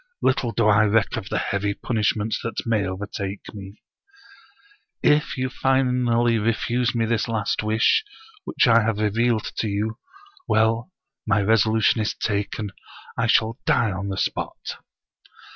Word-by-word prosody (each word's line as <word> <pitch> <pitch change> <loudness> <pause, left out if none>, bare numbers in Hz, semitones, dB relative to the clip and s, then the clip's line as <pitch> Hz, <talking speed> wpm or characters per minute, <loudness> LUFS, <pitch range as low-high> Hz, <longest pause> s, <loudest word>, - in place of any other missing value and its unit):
Little 130 -2 +1
do 115 0 0
I 110 0 +5
reck 105 0 +2
of 110 -3 -5
the - - -1
heavy 100 +1 -1
punishment 110 -1 -1
that 115 - -4
may 110 -4 +1
overtake 100 +1 -6
me. 100 0 -11 0.6
" 270 +11 -32
If 150 - -3
you 130 0 0
finally 125 -3 +2
refuse 120 +2 0
me 115 -1 +1
this 110 0 0
last 110 -3 -1
wish 110 - +2 0.4
which - - +1
I 115 -1 +6
have 110 -1 0
revealed 110 +2 0
to 110 - -1
you 110 +3 -2 0.2
— 400 -2 -26
^well, 110 +5 +2 0.4
my 110 -1 +3
resolution 110 +2 +3
is 105 - -1
taken. 105 0 -2 0.4
I 115 - 0
shall 110 +1 +2
die 115 -3 +3
on 95 +1 -4
the 95 - -4
spot! - - -4
110 Hz, 150 wpm, -23 LUFS, 105-120 Hz, 0.6 s, I